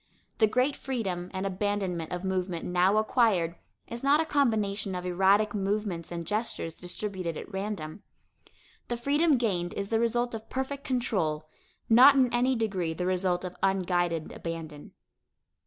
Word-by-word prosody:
The 220 - +6
great 255 +6 +1
freedom 190 -9 -3
and 190 0 -3
abandonment 190 -3 -2
of 180 +1 -4
movement 185 -2 -2
now 180 +3 +3
acquired 215 -7 +2 0.3
is 235 0 -6
not 280 +2 +4
a 325 - +1
combination 215 -9 0
of 180 0 -4
erratic 195 +4 +3
movements 195 -4 -2
and 170 -1 -4
gestures 210 -4 -2
distributed 180 -1 -4
at 205 - -9
random. 195 -3 -4 0.9
The 240 - -2
freedom 290 +4 +3
gained 180 -7 -1
is 200 0 -3
the 225 - +2
result 240 +1 0
of 225 0 -7
perfect 270 +2 -3
control, 185 - -1 0.4
not 255 +5 +8
in 255 -3 +3
any 250 +2 +2
degree 190 -8 -1
the 180 - -2
result 185 0 0
of 180 - -6
unguided 175 -4 0
abandon. 160 -3 -7
195 Hz, 150 wpm, -28 LUFS, 180-235 Hz, 0.9 s, not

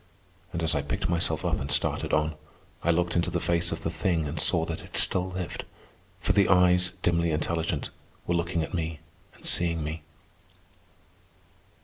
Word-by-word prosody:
And 85 -2 -3
as 80 - +1
I 70 - +1
picked 70 - -2
myself 85 0 +1
up - - +1
and 70 - -4
started - - 0
on, 75 +1 +2 0.5
I - - 0
looked 85 0 +2
into 85 0 +2
the 85 0 -1
face 85 0 0
of 80 0 -4
the 80 - -1
thing 85 -4 0
and 75 +2 -4
saw 80 -3 +3
that 80 -1 -5
it - - -6
still 90 0 +4
lived; 90 -1 -4 0.6
for - - +1
the 100 -2 +4
eyes, 90 -1 +5
dimly 85 -1 +2
intelligent, 80 +1 -1 0.3
were 85 - 0
looking 85 -1 0
at - - -6
me 80 -3 -2 0.4
and - - -14
seeing 85 -2 +1
me. 80 +1 -4
85 Hz, 175 wpm, -27 LUFS, 80-90 Hz, 0.6 s, eyes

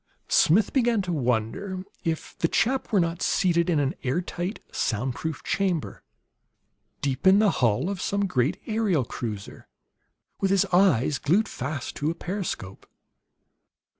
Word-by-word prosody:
Smith 195 +6 +4
began 240 -4 +3
to 180 -3 -2
wonder 135 - -1 0.2
if 160 -1 -3
the 165 - +3
chap 255 +10 0
were 205 - +4
not 170 0 -1
seated 170 -2 +2
in 160 -4 +2
an 140 +1 +1
air 130 +5 0
tight, 180 +3 -4
sound 120 +3 -1
proof 160 +2 -5
chamber, 185 -6 -1 1.0
deep 140 +4 0
in 190 +1 +7
the 210 -2 +4
hull 115 +6 +2
of 195 -2 -3
some 200 0 0
great 140 -4 0
aerial 210 - +1
cruiser, 105 -4 -6 0.7
with 195 - +1
his 195 -1 +3
eyes 150 - +3
glued 195 +9 +2
fast 140 +1 -5
to 150 - -1
a 165 - -2
periscope. 175 - -5
170 Hz, 145 wpm, -26 LUFS, 135-195 Hz, 1.0 s, in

